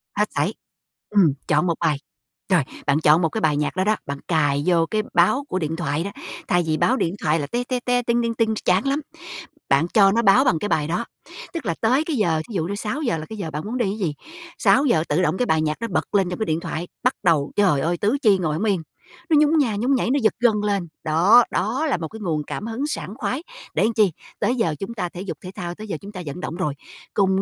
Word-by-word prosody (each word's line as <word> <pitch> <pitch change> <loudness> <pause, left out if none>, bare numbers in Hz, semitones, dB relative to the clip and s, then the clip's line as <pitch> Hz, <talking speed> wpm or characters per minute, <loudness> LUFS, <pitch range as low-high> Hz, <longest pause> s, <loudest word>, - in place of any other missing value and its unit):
Hết - - +1
sẩy. - - +1 0.6
Ừm, 190 -9 +4
chọn 150 +4 +2
một 170 - +2
bài, 155 -4 +1 0.5
rồi, 175 -6 +4 0.2
bạn 140 +2 +3
chọn 155 +2 +5
một 165 - +2
cái 220 - -3
bài 150 -5 +2
nhạc 150 - -1
đó 185 - +1
đó, 215 +2 +2
bạn 140 0 -5
cài 145 -4 +1
vô 170 -2 +3
cái 215 +5 -1
báo 180 +11 +3
của 185 - -1
điện 160 0 -2
thoại 165 -2 -1
đó, 200 - -5 0.4
thay 175 -2 +2
vì 155 - +1
báo 255 - +2
điện 170 -3 -1
thoại 155 +1 +2
là 145 - -3
"te 240 +7 -2
te 250 0 -2
te, 245 0 +1
ting 235 0 +1
ting 230 0 -1
ting" 220 -1 +1
ch - - -7
chán 185 +8 +2
lắm. 280 +3 0 0.7
Bạn 140 +5 +3
cho 200 -3 +6
nó 230 +3 +2
báo 225 +5 +5
bằng 175 - +2
cái 210 - -3
bài 150 -5 +1
đó, 195 +8 -1 0.5
tức 325 -8 -5
là 170 - -1
tới 255 +6 +3
cái 315 -4 -2
giờ, 165 -7 +1
thí - - -7
dụ 170 - 0
như 200 - -3
6:00 235 - -2
là 155 - -6
cái 220 - -7
giờ 165 -6 -4
bạn 150 +2 -4
muốn 235 +4 -3
đi 240 - +1
ấy - - -6
gì, 170 -6 -1 0.4
6:00 250 - +3
tự 155 +5 +2
động 175 +1 +1
cái 250 - +1
bài 160 -7 +2
nhạc 155 0 -1
đó 230 - -3
bật - - -1
lên 190 -3 +3
trong 180 - -5
cái 220 - 0
điện 160 -2 0
thoại, 170 +1 -5 0.2
bắt 255 +1 +3
đầu, 155 -5 +2
trời 180 -9 +3
ơi, 170 +3 0
tứ 215 +10 +1
chi 205 -4 +5
ngồi 155 -4 -1
hổng 170 - -2
yên. 190 -6 +1 0.5
Nó 310 - +5
nhún 305 +2 +4
nha 235 -7 +1
nhún 250 +7 +1
nhảy, 245 - 0
nó 285 - +2
giật 220 - +4
gân 240 -2 +4
lên. 200 -4 0 0.2
Đó, 180 +10 +6
đó 245 - 0
là 260 - +1
một 165 -2 -4
cái 220 - -10
nguồn 160 -7 -1
cảm 215 - -5
hứng 255 +6 -3
sảng 210 - -4
khoái 280 +3 -2 0.3
để 215 - +2
chi, 210 -6 +4 0.3
tới 250 - +1
giờ 170 -10 0
chúng 215 +4 -5
ta 180 -6 -3
thể 180 - -8
dục 195 - -5
thể 185 - -8
thao, 175 -3 -5
tới 215 +2 -9
giờ 175 - -3
chúng 200 +1 -9
ta 185 -3 -7
vận 145 +4 -6
động 165 - -4
rồi. 175 -6 -1 0.4
Cùng 190 -1 +2
190 Hz, 270 wpm, -22 LUFS, 160-230 Hz, 0.7 s, cho